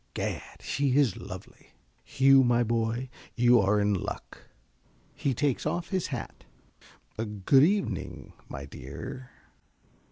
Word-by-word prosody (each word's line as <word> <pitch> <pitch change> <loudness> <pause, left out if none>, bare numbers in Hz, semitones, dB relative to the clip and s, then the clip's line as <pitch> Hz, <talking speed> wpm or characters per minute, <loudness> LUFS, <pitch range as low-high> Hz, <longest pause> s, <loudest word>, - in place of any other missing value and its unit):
_) - - -42
Gad, - - -5
she 140 -2 0
is 135 -10 +3
lovely! - - -10 0.3
Hugh, 135 0 +5
my 120 -1 +3
boy, 115 +2 -1 0.3
you 120 0 +5
are 100 +2 +3
in 105 0 +2
luck. 95 - -5 0.7
(He 135 -3 -1
takes 140 -1 0
off 170 +2 -2
his 185 -3 -1
hat.) 125 -4 -6 1.0
Good 135 -1 +7
evening, 130 - -1 0.2
my 70 0 -6
dear! 70 - -8
125 Hz, 125 wpm, -28 LUFS, 110-140 Hz, 1.0 s, Good